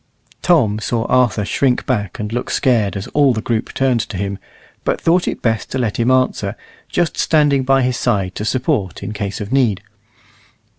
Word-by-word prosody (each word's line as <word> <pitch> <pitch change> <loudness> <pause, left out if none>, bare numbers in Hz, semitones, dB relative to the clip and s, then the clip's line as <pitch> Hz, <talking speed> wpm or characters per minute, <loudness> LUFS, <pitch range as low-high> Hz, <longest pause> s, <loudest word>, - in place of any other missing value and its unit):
Tom 115 -12 +3
saw 115 +1 -1
Arthur 125 -5 +2
shrink 125 +4 +1
back 105 -8 -2
and 105 +1 -4
look 120 +1 -3
scared 115 -7 +1
as 100 - -5
all 145 -3 +3
the - - -1
group 115 -1 -1
turned 130 -3 +1
to 100 - -6
him, 100 +1 -3 0.4
but - - 0
thought 175 +2 +2
it - - -3
best 115 -2 0
to - - -3
let 115 -5 -1
him 120 +1 +1
answer, 130 -5 +1 0.3
just 175 -2 0
standing 145 -3 +3
by 135 0 +3
his 125 -1 0
side 100 -8 0
to 105 - -5
support 125 - -1
in 105 - -4
case 100 -1 -4
of 105 +1 -6
need. 120 -8 +2
120 Hz, 190 wpm, -18 LUFS, 105-130 Hz, 0.4 s, Tom